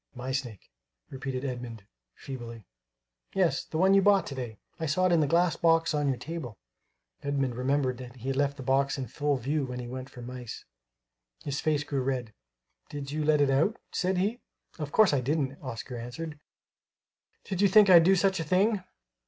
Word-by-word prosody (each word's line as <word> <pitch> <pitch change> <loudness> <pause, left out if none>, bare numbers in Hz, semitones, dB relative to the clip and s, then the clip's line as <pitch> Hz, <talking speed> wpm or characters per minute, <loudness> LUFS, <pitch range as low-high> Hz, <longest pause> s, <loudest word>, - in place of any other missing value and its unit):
"My 125 +1 -4
snake," 125 - -5 0.4
repeated 135 0 -4
Edmund, 120 -5 -5 0.3
feebly. 115 -5 -8 0.7
"Yes; - - +2
the - - -5
one 190 +3 +5
you 195 - +6
bought 200 0 +4
to - - -6
day. 120 -5 -6 0.2
I 160 - -2
saw 185 +6 +2
it 185 - +3
in 170 - +4
the 150 - +2
glass 170 +1 +3
box 165 -1 +3
on 145 -1 +1
your 135 -2 +1
table." 155 - -6 0.6
Edmund 140 -3 -1
remembered 130 0 0
that 125 -1 -9
he 130 +1 -5
had 135 - 0
left 140 0 0
the 135 - -7
box 135 +2 +1
in 135 - -3
full 145 +1 -1
view 140 +4 -1
when 125 -1 -5
he 120 - -6
went 130 +2 -6
for 125 - -11
mice. 125 -1 -8 0.8
His 140 0 -3
face 150 -2 +1
grew 140 -2 -2
red. 125 -4 -2 0.6
"Did 140 -1 -6
you 155 +1 -1
let 150 -1 +3
it 140 -1 +3
out?" 160 - +2
said 185 +1 0
he. 210 +6 0 0.4
"Of 150 -2 -4
course 215 -3 +5
I 135 - +2
didn't," 140 0 -1
Oscar 125 -1 -6
answered. 150 +6 -6 1.0
"Did 190 -1 -3
you 205 - +6
think 210 +1 +7
I'd 175 -3 +8
do 190 +3 +5
such 190 0 +2
a - - -1
thing? 190 +5 +2
140 Hz, 195 wpm, -28 LUFS, 130-165 Hz, 1.0 s, I'd